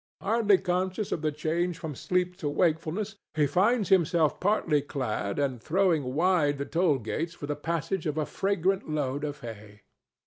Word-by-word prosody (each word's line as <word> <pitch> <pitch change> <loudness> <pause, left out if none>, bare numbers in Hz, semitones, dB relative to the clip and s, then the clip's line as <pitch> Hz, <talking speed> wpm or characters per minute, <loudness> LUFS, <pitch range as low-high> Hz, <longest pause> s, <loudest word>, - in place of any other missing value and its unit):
Hardly 210 -1 +3
conscious 185 +3 -1
of 160 - -1
the 155 -1 0
change 165 +3 -1
from 160 -2 -5
sleep 180 +5 -1
to 155 -6 -2
wakefulness, 170 +6 0 0.2
he 150 -1 +3
finds 200 - +2
himself 170 -4 +3
partly 180 -7 +2
clad 130 -8 -3
and 135 -5 -1
throwing 160 -6 +1
wide 160 -4 +3
the 140 - -3
toll 165 -3 +2
gates 155 +9 -3
for 145 - -7
the 145 0 -2
passage 165 +3 -2
of 150 0 -2
a 155 - +1
fragrant 195 -1 0
load 145 -2 -1
of 145 0 -4
hay. 105 -3 -10
160 Hz, 170 wpm, -28 LUFS, 145-185 Hz, 0.2 s, Hardly